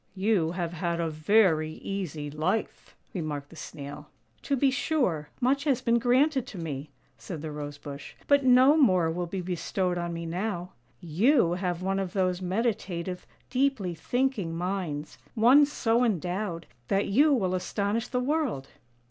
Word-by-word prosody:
' - - -39 0.2
You 165 -6 +2
have 175 -2 -3
had 170 0 -2
a 165 -1 -1
very 155 -1 +3
easy 160 -8 -5
life," 155 +9 -2 0.2
remarked 150 -5 -4
the - - -12
Snail. 145 -1 -8 0.2
" 110 - -38
To 280 - 0
be 270 +1 +3
sure, 250 - 0
much 275 +3 +1
has 270 -4 +2
been 235 -2 +2
granted 260 +3 +2
to 200 - -9
me," 150 -3 -5 0.3
said 165 -5 -7
the 155 - -4
Rose 145 -1 -6
bush, 145 0 -9
" - - -26
but 285 -1 +4
no 260 +3 +6
more 185 - +4
will 175 +1 -3
be 185 +2 -4
bestowed 180 +1 -2
on 175 0 -3
me 170 0 -5
now. 180 +1 -3 0.3
You 180 - +3
have 180 -1 -2
one 195 +1 0
of 190 -1 -3
those 185 -2 0
meditative, 185 -3 -2 0.2
deeply 255 -9 +1
thinking 235 - -1
minds, 175 -5 -3 0.2
one 255 +6 +6
so 235 -4 +1
endowed 180 -4 -1 0.2
that 195 +1 +1
you 285 +10 +4
will 195 -9 +1
astonish 200 +5 -1
the 250 - -1
world." 250 - -1
185 Hz, 165 wpm, -28 LUFS, 165-240 Hz, 0.3 s, no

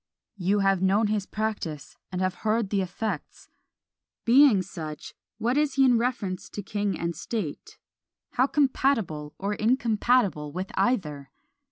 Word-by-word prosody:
You 200 +2 +1
have 195 -1 +2
known 200 +3 +3
his 205 -2 -2
practice, 210 -9 -4 0.2
and 180 0 -2
have 185 -1 +1
heard 220 -1 0
the 200 -2 +2
effects. 190 -2 -5 0.8
Being 240 -5 +6
such, 155 -4 -7 0.2
what 235 +4 0
is 295 -2 +1
he 270 -1 +5
in 245 -3 +4
reference 230 -7 -2
to 205 - -6
king 205 -2 -2
and 170 0 -3
state; 200 -11 -5 0.5
how 255 +2 +2
compatible 255 - 0
or 200 +2 -2
incompatible 220 - +1
with 185 +3 -4
either? 155 - 0
205 Hz, 140 wpm, -26 LUFS, 185-235 Hz, 0.8 s, Being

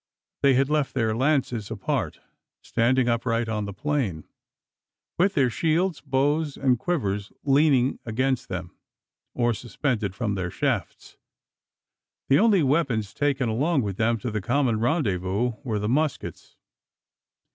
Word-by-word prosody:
They 135 -2 +5
had 135 +1 +3
left 150 -2 0
their 110 -4 +1
lances 125 -5 0
apart, - - -3 0.4
standing 120 +2 +2
upright 115 -1 0
on 105 -2 -2
the 100 - -5
plain, 110 - -2 1.0
with 195 +3 +3
their 135 -5 +3
shields, 165 +6 0
bows, 145 +2 0
and 130 -3 +2
quivers 105 - -2
leaning 135 -2 +3
against 125 +2 -1
them, 90 -2 -5 0.6
or 120 -1 +2
suspended 115 -4 -2
from 110 -3 -1
their 95 -3 -2
shafts. - - -3 1.1
The 135 - +5
only 205 -5 +4
weapons 130 -8 0
taken 140 -3 0
along 135 +6 +1
with 100 -2 -4
them 115 +1 +2
to 125 - -3
the 105 -1 -2
common 120 +2 +1
rendezvous 110 - 0
were 110 -5 -2
the 105 0 -2
muskets. 150 +5 -2
125 Hz, 135 wpm, -25 LUFS, 110-145 Hz, 1.1 s, They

